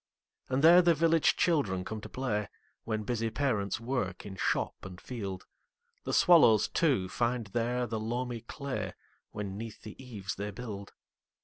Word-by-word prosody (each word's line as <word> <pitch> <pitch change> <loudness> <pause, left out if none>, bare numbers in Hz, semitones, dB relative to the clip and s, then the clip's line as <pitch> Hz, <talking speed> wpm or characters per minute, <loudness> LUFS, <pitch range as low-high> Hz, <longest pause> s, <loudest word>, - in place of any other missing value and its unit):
And 130 +3 0
there 175 +3 +9
the 170 -1 +4
village 165 +1 +3
children 105 - +1
come 110 0 -5
to - - -9
play, 105 -6 -2 0.4
When 110 -1 -2
busy 115 0 -1
parents 110 -5 -1
work 115 -7 -3
in 100 -2 -7
shop - - 0
and 95 -1 -9
field. 100 -7 -6 0.6
The - - -2
swallows, 150 - +6
too, 135 - +1
find 120 +3 -1
there 120 +1 0
the 110 -1 -3
loamy 120 +1 -3
clayWhen 140 +3 -5 0.6
'neath 110 +2 -8
the 110 +5 -10
eaves 100 -7 -5
they 100 +1 -4
build. 100 -2 -7
115 Hz, 150 wpm, -30 LUFS, 105-130 Hz, 0.6 s, there